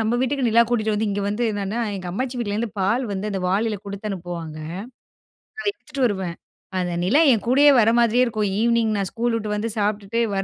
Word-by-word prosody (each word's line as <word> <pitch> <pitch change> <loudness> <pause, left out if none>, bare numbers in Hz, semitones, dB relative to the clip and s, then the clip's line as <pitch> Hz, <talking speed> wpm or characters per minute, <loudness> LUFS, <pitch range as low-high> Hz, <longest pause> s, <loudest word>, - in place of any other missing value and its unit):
நம்ம 225 +1 +1
வீட்டுக்கு 260 0 0
நிலா 230 +1 +5
கூட்டிகிட்டு 220 -3 +1
வந்து 215 +1 0
இங்க 200 0 -2
வந்து 210 +4 -2
என்னான்னா, 205 +3 -2 0.2
எங்க 185 -2 -7
அம்மாச்சி 250 +5 -3
வீட்லேருந்து 220 -1 -2
பால் 230 +7 +1
வந்து 200 +2 -3
அந்த 195 -2 -2
வாளியில 210 +3 +1
குடுத்து 200 +1 -6
அனுப்புவாங்க. 170 -4 -6 1.0
அத - - -6
எடுத்துட்டு 280 -9 -3
வருவேன். 190 -5 -3 0.4
அந்த 180 -1 -1
நிலா 235 +12 +3
என் 220 - -2
கூடயே 280 +4 +6
வர 215 - +4
மாதிரியே 235 +1 +4
இருக்கும் 215 -4 -1
ஈவினிங் 235 -1 +2
நான் 195 -2 -1
ஸ்கூல் 235 0 0
விட்டு 210 -2 -2
வந்து 220 +2 -2
சாப்பிட்டுட்டு 205 +2 -1 0.2
வர 195 - 0
215 Hz, 195 wpm, -22 LUFS, 195-235 Hz, 1.0 s, கூடயே